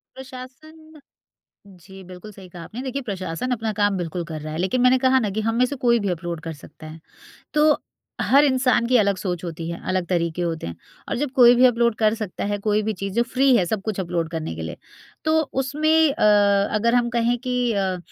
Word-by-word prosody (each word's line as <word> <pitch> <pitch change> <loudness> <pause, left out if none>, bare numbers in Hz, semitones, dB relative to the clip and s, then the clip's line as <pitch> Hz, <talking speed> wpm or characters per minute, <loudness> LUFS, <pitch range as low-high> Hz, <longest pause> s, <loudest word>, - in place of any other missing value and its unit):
प्रशासन, 290 +5 -12 0.7
जी 190 0 -14
बिल्कुल 185 +3 -11
सही 190 -2 -13
कहा 175 -1 -10
आपने। 225 +8 -8
देखिए 270 +1 -4
प्रशासन 195 0 -4
अपना 225 -2 -1
काम 205 -1 +2
बिल्कुल 175 0 -4
कर 160 -2 -7
रहा 155 0 -6
है 160 - -4
लेकिन 190 +8 0
मैंने 250 +1 +5
कहा 260 0 +5
ना 215 -5 -1
कि - - +1
हम 225 - -1
में 250 - +4
से 285 - -5
कोई 235 -1 +4
भी 205 -2 -2
अपलोड 170 -1 -4
कर 165 0 -6
सकता 155 +1 -13
है। 155 +1 -10 0.5
तो 300 0 +4 0.4
हर 280 +2 +4
इंसान 255 -3 +2
की 250 +1 +4
अलग 200 -3 +2
सोच 180 -2 -4
होती 165 -1 -5
है, 170 - -5
अलग 185 -1 0
तरीके 170 -1 -1
होते 165 - -3
हैं 85 - -6 0.3
और - - -1
जब 285 0 -2
कोई 245 -2 +7
भी 250 +1 +5
अपलोड 235 -2 +3
कर 215 -1 +2
सकता 205 -3 -4
है 205 - -1
कोई 210 +1 +1
भी 220 +1 -1
चीज़ 195 -1 -3
जो 235 - +3
फ्री 265 0 +4
है 185 - +2
सब 205 +3 -2
कुछ 215 -3 -3
अपलोड 170 -3 -2
करने 160 - -5
के 80 - -7
लिए। 80 0 -6 0.5
तो 315 0 +3 0.2
उसमें 295 +4 -1 0.2
अ, - - -2 0.5
अगर 235 +3 +2
हम 240 -1 +2
कहें 240 0 +1
कि 250 -1 -1
अ, 190 -2 -1
215 Hz, 225 wpm, -22 LUFS, 175-250 Hz, 0.7 s, कोई